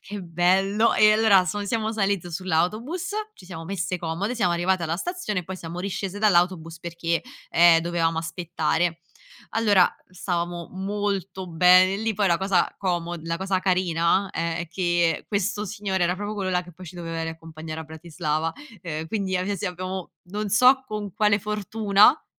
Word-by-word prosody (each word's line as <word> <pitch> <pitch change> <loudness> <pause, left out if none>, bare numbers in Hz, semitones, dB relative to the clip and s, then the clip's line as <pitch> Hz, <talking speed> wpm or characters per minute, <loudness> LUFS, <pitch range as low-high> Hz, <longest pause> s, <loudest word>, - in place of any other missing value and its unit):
"Che 205 0 -7
bello!" 190 +6 +2
E 215 0 +6
allora 215 -4 +5
son 205 +2 -3
siamo 220 +1 -1
saliti 195 -4 -1
sull'autobus, 215 - -1 0.2
ci - - -16
siamo 165 -3 -8
messe 185 -1 -2
comode, 175 +8 -2
siamo 190 -8 +1
arrivate 175 +1 +1
alla 165 +1 -1
stazione, 215 - -3
poi 190 +2 -6
siamo 170 +1 -7
riscese 195 +1 -4
dall'autobus 175 -5 +2
perché, 170 0 -2 0.3
ehm, 170 -1 +6
dovevamo 165 -1 0
aspettare. 165 0 -1 0.5
Allora, 205 -5 +4 0.2
stavamo 175 -2 -3
molto 195 -1 -3
bene 180 +3 +5
lì, 220 +1 -1
poi 200 -1 +2
la 170 - +2
cosa 190 -1 +1
como 175 -2 -1
la 165 0 -2
cosa 190 0 0
carina 185 0 +1
è 165 0 -3
che 175 -2 +1
questo 205 0 -1
signore 195 -3 -1
era 180 - +1
proprio 205 +1 -4
quello 195 -2 -2
là 180 0 +1
che 175 0 -14
poi 180 +2 -12
ci 180 - -10
doveva 165 -1 -4
riaccompagnare 160 -1 -7
a - - -7
Bratislava, 160 0 -3 0.3
ehm, 160 -2 -5
quindi 195 -3 -1
abbia 195 +2 -1
sì - - -3
abbiamo 185 0 -5
non 205 +3 -4
so 255 +5 +5
con 210 -3 -5
quale 210 -1 +3
fortuna, 210 0 +3
a 300 - -9
185 Hz, 165 wpm, -24 LUFS, 170-205 Hz, 0.5 s, E